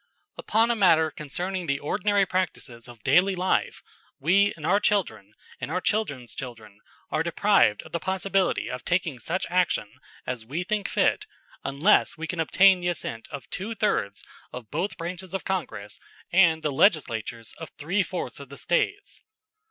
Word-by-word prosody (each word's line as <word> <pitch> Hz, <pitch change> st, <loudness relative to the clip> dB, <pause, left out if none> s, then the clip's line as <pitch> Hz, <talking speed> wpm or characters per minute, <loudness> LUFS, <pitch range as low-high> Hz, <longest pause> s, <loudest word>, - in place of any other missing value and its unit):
Upon 225 Hz, +2 st, +2 dB
a -, -, +1 dB
matter 165 Hz, -6 st, +4 dB
concerning 180 Hz, +5 st, -4 dB
the 140 Hz, -1 st, +1 dB
ordinary 200 Hz, +7 st, +1 dB
practices 135 Hz, -10 st, -3 dB
of 120 Hz, -3 st, -14 dB
daily 190 Hz, +2 st, +4 dB
life, 185 Hz, +1 st, 0 dB, 0.3 s
we 195 Hz, +8 st, +3 dB
and 155 Hz, -, -7 dB
our 200 Hz, +5 st, +4 dB
children 110 Hz, -, 0 dB, 0.2 s
and -, -, -5 dB
our 180 Hz, +4 st, 0 dB
children's 145 Hz, -, -2 dB
children 110 Hz, -5 st, -9 dB, 0.3 s
are -, -, +1 dB
deprived 105 Hz, -, +3 dB
of -, -, -14 dB
the 170 Hz, -, -2 dB
possibility 190 Hz, +1 st, 0 dB
of 125 Hz, -, -5 dB
taking 170 Hz, -7 st, 0 dB
such 170 Hz, +10 st, -2 dB
action 175 Hz, -, +1 dB, 0.3 s
as 125 Hz, -3 st, -4 dB
we 150 Hz, +10 st, -3 dB
think 205 Hz, 0 st, -1 dB
fit -, -, +1 dB, 0.4 s
unless 160 Hz, +7 st, +3 dB
we 165 Hz, -, -4 dB
can 170 Hz, +1 st, -4 dB
obtain 190 Hz, +3 st, +5 dB
the 175 Hz, -, -3 dB
assent 115 Hz, -9 st, -4 dB
of 140 Hz, -, -8 dB
twothirds 200 Hz, -, -1 dB, 0.3 s
of 120 Hz, -4 st, -9 dB
both 195 Hz, +1 st, -2 dB
branches 180 Hz, +2 st, -5 dB
of 195 Hz, -, -4 dB
Congress 110 Hz, -, -4 dB, 0.3 s
and 165 Hz, -3 st, +4 dB
the 150 Hz, -, 0 dB
Legislatures 120 Hz, -, +1 dB
of 160 Hz, -, -7 dB
three 175 Hz, +8 st, 0 dB
fourths 180 Hz, -5 st, -4 dB
of 140 Hz, -2 st, -10 dB
the 140 Hz, -, -10 dB
States. 405 Hz, -, -1 dB
170 Hz, 160 wpm, -26 LUFS, 130-190 Hz, 0.4 s, obtain